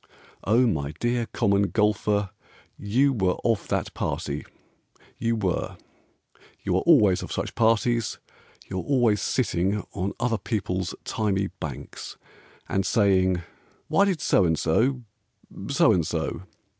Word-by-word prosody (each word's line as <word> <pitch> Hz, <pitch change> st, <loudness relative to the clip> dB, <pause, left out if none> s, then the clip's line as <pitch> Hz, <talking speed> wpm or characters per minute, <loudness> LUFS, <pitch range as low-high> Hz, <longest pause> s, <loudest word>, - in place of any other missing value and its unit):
O, 115 Hz, +5 st, +4 dB
my 75 Hz, -10 st, -1 dB
dear 120 Hz, +6 st, -1 dB
Common 100 Hz, 0 st, +1 dB
Golfer, 105 Hz, -1 st, +1 dB, 0.4 s
You 130 Hz, +7 st, +2 dB
were 95 Hz, -6 st, +1 dB
of 115 Hz, -3 st, +1 dB
that -, -, -2 dB
party; -, -, -3 dB, 0.7 s
You 115 Hz, 0 st, +1 dB
were; 95 Hz, -5 st, -2 dB, 0.9 s
You 90 Hz, -, 0 dB
are -, -, +1 dB
always 105 Hz, -, +5 dB
of -, -, -7 dB
such -, -, -3 dB
parties, 115 Hz, +1 st, +1 dB, 0.5 s
You 95 Hz, -, -3 dB
are -, -, -4 dB
always 120 Hz, -6 st, +2 dB
sitting 100 Hz, -4 st, 0 dB
On 95 Hz, +2 st, -2 dB
other 115 Hz, -3 st, 0 dB
people's 95 Hz, -4 st, -2 dB
thymy 100 Hz, -3 st, -1 dB
banks, 70 Hz, -5 st, -7 dB, 0.5 s
And 95 Hz, -, 0 dB
saying, 95 Hz, -4 st, +2 dB, 0.5 s
"Why 200 Hz, -, +4 dB
did 185 Hz, -6 st, -1 dB
So 100 Hz, -, +3 dB
and 80 Hz, -2 st, +2 dB
so 125 Hz, -, +1 dB, 0.7 s
so -, -, +4 dB
and 85 Hz, -, +2 dB
so?" 85 Hz, +2 st, -3 dB
100 Hz, 130 wpm, -25 LUFS, 95-115 Hz, 0.9 s, always